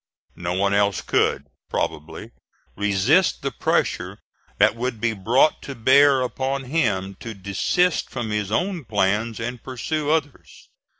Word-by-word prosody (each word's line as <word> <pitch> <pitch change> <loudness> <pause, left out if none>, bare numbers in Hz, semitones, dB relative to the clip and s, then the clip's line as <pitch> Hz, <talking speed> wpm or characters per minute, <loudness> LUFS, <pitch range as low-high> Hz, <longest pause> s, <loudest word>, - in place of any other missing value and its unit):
No 85 0 -3
one 100 +1 +1
else 100 -1 +2
could, 70 - 0 0.2
probably, 75 0 -4 0.4
resist 100 -2 +2
the - - -1
pressure - - -1 0.4
that - - +4
would 120 -1 -3
be 115 +1 0
brought 115 +9 +2
to 140 - -7
bear 135 +3 +5
upon 135 +2 -2
him 110 -10 -1
to 115 -2 -7
desist 100 - 0
from 120 -4 -4
his 105 -1 -2
own 175 - -1
plans 105 +1 0
and 120 +1 -5
pursue 145 +4 -3
others. 155 -3 -3
115 Hz, 135 wpm, -23 LUFS, 100-135 Hz, 0.4 s, bear